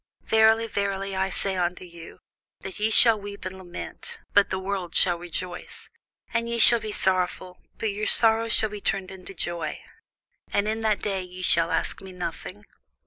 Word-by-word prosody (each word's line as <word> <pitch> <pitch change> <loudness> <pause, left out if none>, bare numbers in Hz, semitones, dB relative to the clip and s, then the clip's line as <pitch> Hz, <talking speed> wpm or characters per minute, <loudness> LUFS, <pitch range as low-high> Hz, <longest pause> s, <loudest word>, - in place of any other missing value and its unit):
Verily, 220 +1 +3
verily, 195 -2 -3
I 190 0 -1
say 195 +1 -3
unto 180 0 -3
you, 170 -1 -14 0.4
That 190 +1 -8
ye 215 +1 0
shall 225 -1 +6
weep 200 -1 -9
and 185 0 -6
lament, 185 - -8 0.2
but 205 -1 +4
the 190 - -2
world 190 -2 -5
shall 175 -2 +2
rejoice: 175 +1 -7 0.4
and 230 0 -1
ye 235 - -2
shall 235 +1 +9
be 215 -1 -6
sorrowful, 185 -2 -2 0.2
but 220 - -2
your 210 +2 -4
sorrow 225 0 +6
shall 220 -1 +2
be 210 -1 -8
turned 195 -1 -2
into 190 0 -11
joy. 170 -2 -4 0.7
And 205 - 0
in 220 +1 -2
that 215 -2 -1
day 195 -2 -2
ye 180 0 -10
shall 165 -1 +3
ask - - -2
me 190 -1 -11
nothing. 180 +3 -7
195 Hz, 180 wpm, -24 LUFS, 180-215 Hz, 0.7 s, shall